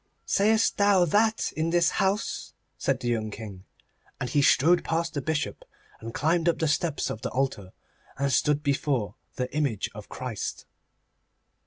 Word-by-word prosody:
'Sayest 220 +2 +3
thou 200 -3 +5
that 215 +6 +2
in 160 +1 0
this 175 0 +3
house?' 195 +2 -1 0.2
said 135 -2 0
the 120 - -3
young 110 -2 0
King, 100 -3 -9 0.5
and 125 - -3
he 145 - +3
strode 165 +5 +4
past 165 +1 -1
the 145 - -2
Bishop, 155 +1 -2 0.4
and 115 +1 -7
climbed 165 +6 +1
up 170 - +1
the 160 - 0
steps 150 +1 0
of 110 - -6
the - - -2
altar, 130 -8 -2 0.5
and 140 -1 0
stood 150 0 +2
before 140 -6 0 0.2
the 125 +2 -4
image 135 -10 -1
of - - -10
Christ. - - -5
150 Hz, 160 wpm, -27 LUFS, 125-170 Hz, 0.5 s, thou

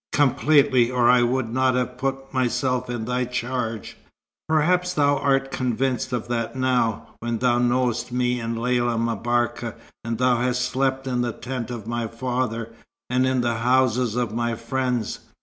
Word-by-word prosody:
"Completely. 140 -2 +4
Or 125 -1 +4
I 125 -1 +5
would 120 0 0
not 130 0 +2
have 125 0 -2
put 135 0 -3
myself 125 0 0
in 120 -2 -3
thy 125 +1 0
charge." 120 -3 -3 0.5
"Perhaps 180 +3 +2
thou 145 -1 +3
art 135 -1 +1
convinced 130 0 -1
of 120 -1 -2
that 115 0 -2
now, 125 -4 0
when 120 0 -2
thou 120 0 +2
knowest 125 0 +1
me 125 0 0
and 115 0 -3
Lella 120 -1 +1
M'Barka, 115 +1 -1 0.3
and 115 0 -3
thou 125 0 +3
hast 125 +1 0
slept 135 +1 -1
in 125 -2 -1
the 120 -1 -1
tent 125 0 -5
of 120 -4 -6
my 120 0 -2
father, 115 -1 -3 0.4
and 130 +1 +2
in 130 -1 +1
the 120 -2 0
houses 125 -1 +2
of 120 -3 -1
my 120 0 -1
friends. 125 -1 -2
125 Hz, 165 wpm, -23 LUFS, 120-130 Hz, 0.5 s, I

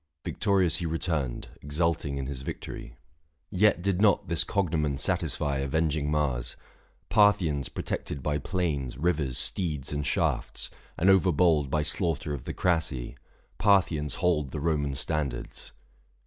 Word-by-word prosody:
Victorious 95 -5 +2
he 85 -2 -3
Returned, 80 -7 -2
exulting 75 -1 -1
in 70 - -3
his 65 -1 -5
victory. - - -7 0.6
Yet 100 -2 +3
did 100 -1 +1
not 105 -4 +3
this 85 -1 +4
cognomen 80 -8 0
satisfy 70 +1 0
Avenging 75 +1 0
Mars. 70 -6 -1 0.5
Parthians 85 - +3
protected 70 -3 -4
by 75 -1 0
660 70 - -9
Plains, 75 -9 -1
rivers, 75 -6 0
steeds, 75 -7 -1
and 75 0 -1
shafts 65 - -1
— - - -29
and 95 +4 +5
overbold 85 -6 +3
By 75 +2 +1
slaughter 80 -1 0
of 65 -4 -6
the - - -4
Crassi 80 -8 0 0.2
— - - -35
Parthians 85 -8 +3
hold 75 -6 +1
The 75 - -5
Roman 75 -3 0
standards. 70 -3 -3
75 Hz, 140 wpm, -28 LUFS, 70-90 Hz, 0.6 s, and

